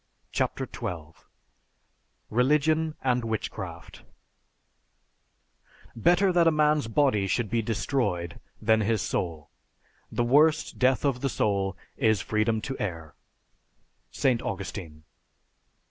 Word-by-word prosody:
CHAPTER - - -1
XII 80 -3 -5 1.2
RELIGION 150 +6 +2
AND 125 -1 +2
WITCHCRAFT 110 -2 -5 1.9
Better 175 - +3
that 170 -1 +4
a - - +6
man's 150 -4 +2
body 115 -5 +2
should 110 +2 -1
be 115 -1 +2
destroyed 110 - -2 0.2
than 110 0 +3
his 110 0 +1
soul. 80 -4 -3 0.6
The 120 - 0
worst 150 +6 +3
death 130 +2 +3
of 130 -3 0
the 135 - 0
soul 100 -5 0 0.2
is 110 -2 +3
freedom 110 +3 0
to 135 +4 -4
err. 80 -6 -4 1.0
ST. 125 -3 +1
AUGUSTINE. 90 -5 -6
115 Hz, 105 wpm, -27 LUFS, 100-140 Hz, 1.9 s, a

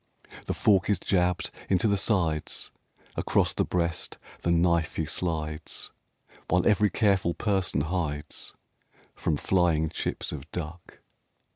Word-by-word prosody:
The - - -2
fork 95 -3 +3
is 105 - +4
jabbed 90 -1 +1 0.2
into 95 +3 +3
the 100 - +3
sides 85 -7 0 0.4
Across - - +2
the - - +1
breast 85 -2 -2 0.2
the - - -1
knife 85 -1 +2
he 80 - 0
slides 75 -2 -3 0.6
While 90 0 +3
every 105 -1 +4
careful 95 -3 +2
person 95 -8 0
hides 75 -3 -3 0.6
From 75 - -1
flying 85 -3 +2
chips - - -3
of 70 -3 -7
duck. 85 0 -7
85 Hz, 125 wpm, -28 LUFS, 80-95 Hz, 0.6 s, is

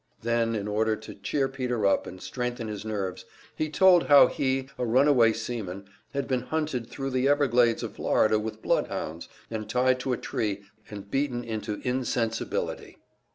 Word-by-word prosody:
Then, 115 -1 +1
in 105 -1 -3
order 110 +1 +1
to 110 - -10
cheer 135 +7 -1
Peter 125 -5 -2
up 100 - +2
and 95 - -9
strengthen 125 +1 -4
his 105 -2 -5
nerves, 100 -4 -3 0.3
he 155 - -1
told 180 +1 +5
how 145 -1 +9
he, 135 -1 -1
a - - 0
runaway 125 -1 +4
seaman, 110 -4 -5 0.3
had 140 - -1
been 130 -2 0
hunted 150 -7 -2
thru 135 -1 -5
the 130 +1 +1
Everglades 125 -5 +3
of - - -6
Florida 110 0 +2
with 110 +1 -6
bloodhounds, 80 +2 -2 0.2
and 110 -1 -4
tied 130 +1 +2
to 130 +1 -2
a 125 - 0
tree 100 -2 -3 0.3
and 100 -1 -9
beaten 135 -3 0
into 110 -2 -4
insensibility. 125 -3 -2
120 Hz, 165 wpm, -27 LUFS, 110-130 Hz, 0.3 s, how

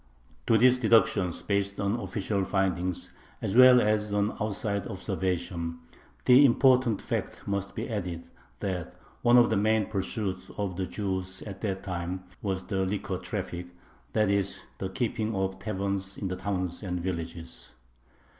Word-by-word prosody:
To 115 - +5
these 125 +2 +5
deductions, 110 -6 +3
based 100 0 -1
on 100 +4 0
official 100 -4 -1
findings, 95 -2 -1 0.3
as 95 - -2
well 130 0 +9
as 105 -1 +1
on 105 +1 +1
outside 100 -1 -1
observation, 85 -2 -2 0.5
the 125 +3 +8
important 130 -4 +4
fact - - -4
must 100 0 -2
be - - -3
added 90 -7 -4 0.3
that 90 -4 -3 0.3
one 120 +1 +6
of 120 -2 +6
the 110 - +3
main 110 +1 +3
pursuits 100 -1 -2
of 100 -3 -2
the 95 0 -2
Jews 95 -1 -3
at 100 -2 -8
that 95 -3 -2
time 90 -1 -4 0.2
was 95 -2 -2
the 95 -2 -1
liquor 95 +2 -2
traffic, 90 0 -4 0.5
that 105 -2 +3
is, 100 -1 0 0.2
the 95 - -2
keeping 110 0 -1
of 95 0 -1
taverns 100 -1 -2
in 95 - -3
the 90 - -2
towns 90 -2 -3
and 90 -3 -3
villages. 85 -2 -5
100 Hz, 150 wpm, -28 LUFS, 95-105 Hz, 0.5 s, well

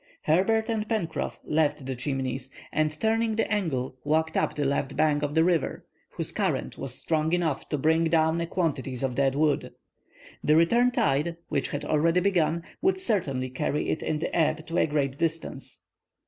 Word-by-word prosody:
Herbert 220 +8 +2
and 220 -2 -2
Pencroff 205 -8 -2
left 150 -2 0
the 130 0 -3
Chimneys, 130 0 -3 0.2
and 155 0 +1
turning 225 0 +1
the 225 - +1
angle, 135 -10 -2
walked 160 +1 +1
up - - +1
the 145 - -1
left 140 0 -1
bank 150 -2 +3
of 145 0 -2
the 160 - +5
river, 170 -4 0 0.2
whose - - -4
current - - -1
was 130 -2 -4
strong 160 0 0
enough 165 -6 0
to 150 - 0
bring 160 +4 +3
down 160 0 +2
a 170 - -2
quantity 145 -7 -1
of 130 -2 0
dead 135 +1 +1
wood. 150 0 +1 0.7
The 150 - +4
return 235 +10 +4
tide, 170 - +1
which 140 -3 0
had 145 +1 -4
already 165 +4 +3
begun, 170 -4 +1 0.2
would 380 +1 +2
certainly 140 - -1
carry 140 +3 -1
it - - -1
in 155 - -1
the 160 - -3
ebb 160 -1 +1
to 165 - -1
a - - +3
great 140 -2 -1
distance. 165 -1 -3
155 Hz, 180 wpm, -27 LUFS, 140-170 Hz, 0.7 s, the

